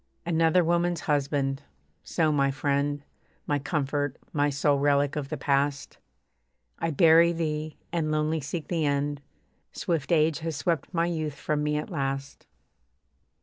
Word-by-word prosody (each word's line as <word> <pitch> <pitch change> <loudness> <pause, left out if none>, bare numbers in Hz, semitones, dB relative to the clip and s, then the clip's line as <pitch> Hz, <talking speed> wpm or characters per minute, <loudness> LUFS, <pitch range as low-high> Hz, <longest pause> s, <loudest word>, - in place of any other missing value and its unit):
Another 165 +1 +3
woman's 170 0 +1
husband. 140 -2 0 0.4
So, 160 -3 +1
my 140 -2 +2
friend, 140 +1 -1 0.4
My 145 -1 0
comfort, 145 -1 -1 0.2
my 145 -2 +2
sole 140 0 +1
relic 140 0 +2
of 145 -2 -3
the - - -3
past, 140 0 -1 0.8
I 165 - 0
bury 165 +1 +6
thee, 155 -2 -3 0.2
and, 160 -3 0
lonely, 155 +1 0
seek 150 +2 -5
the 165 -3 -1
end. 145 0 0 0.5
Swift 165 -3 -2
age 160 -1 +3
has 160 -1 -3
swept 165 -1 -1
my 170 -2 +1
youth 155 -4 -2
from 150 0 -2
me 150 0 0
at 150 - -5
last. 135 -3 -4
150 Hz, 145 wpm, -27 LUFS, 140-165 Hz, 0.8 s, bury